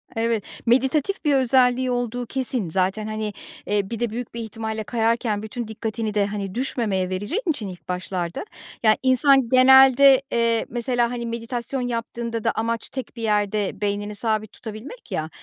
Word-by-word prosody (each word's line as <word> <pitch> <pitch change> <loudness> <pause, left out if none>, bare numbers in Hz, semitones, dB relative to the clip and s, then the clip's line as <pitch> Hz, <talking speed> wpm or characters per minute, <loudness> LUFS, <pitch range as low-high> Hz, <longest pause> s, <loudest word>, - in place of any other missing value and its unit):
Evet, 225 -2 0 0.2
meditatif 265 +9 +1
bir 290 -2 +4
özelliği 255 -1 +3
olduğu 245 0 -2
kesin. 250 -6 -1
Zaten, 190 +5 0
hani, 215 -1 -3 0.3
eee, 205 -1 0
bir 230 - -4
de 240 -1 0
büyük 235 +2 -6
bir 235 - -5
ihtimalle 220 0 -4
kayarken 225 -1 0
bütün 230 +1 -5
dikkatini 220 0 -4
de, 205 -1 +2
hani, 200 -2 -5
düşmemeye 220 -7 -1
vereceğin 205 - -2
için 260 -10 -1
ilk 180 -4 -10
başlarda, 180 - -3 0.4
ya, 215 -1 +6
insan 260 -1 +4
genelde, 265 +1 +7
eee, 230 -1 +1
mesela, 240 0 0
hani, 240 -1 -4
meditasyon 235 +2 -4
yaptığında 235 -1 -3
da - - +2
amaç 230 +1 -2
tek 260 -2 -7
bir 230 - -7
yerde 210 -1 0
beynini 205 0 -2
sabit 215 -1 -1
tutabilmek 230 - -10
ya. 155 0 -2
230 Hz, 160 wpm, -23 LUFS, 210-250 Hz, 0.4 s, genelde